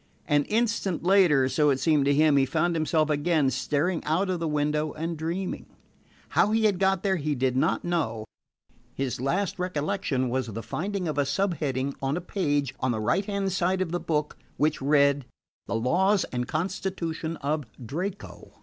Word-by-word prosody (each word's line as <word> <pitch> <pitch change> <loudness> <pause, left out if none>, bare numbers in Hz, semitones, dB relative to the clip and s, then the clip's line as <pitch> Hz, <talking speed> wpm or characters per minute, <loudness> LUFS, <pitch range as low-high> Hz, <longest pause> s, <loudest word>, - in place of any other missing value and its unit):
An 145 -1 +3
instant 215 -6 0
later, 175 -8 +5
so 150 +2 +2
it 135 -2 +2
seemed 150 -1 +3
to 140 - +3
him, 155 0 +4
he 135 -1 +4
found 170 +3 +1
himself 155 -1 +1
again 150 -2 +2
staring 150 +7 -1
out 185 +5 0
of 180 - -2
the 165 - -1
window 150 0 0
and 165 +2 -3
dreaming. 170 +4 -4 0.6
How - - +3
he 220 +1 +2
had 200 -4 +2
got 190 -1 +2
there 190 -2 +2
he 150 -1 -1
did 130 0 0
not 130 - +1
know. 115 -11 -1 0.7
His 130 -2 -3
last 190 +8 -1
recollection 155 -5 -1
was 130 0 -1
the 115 +1 -6
finding 190 +1 -3
of 150 -2 -1
a - - +4
subheading 140 -5 -1
on 135 +3 0
a - - -1
page 145 -7 -1
on 130 - 0
the 110 - -2
right 175 - +1
hand 200 -2 -1
side 185 +1 +1
of 185 -3 -1
the 175 - -1
book 150 -3 -2 0.2
which 150 0 +1
read: 140 0 +3 0.4
"The - - -2
Laws 185 - +2
and 125 0 -2
Constitution 165 -1 -3
of 145 +1 -2 0.2
Draco." 180 - -6
155 Hz, 180 wpm, -26 LUFS, 140-185 Hz, 0.7 s, later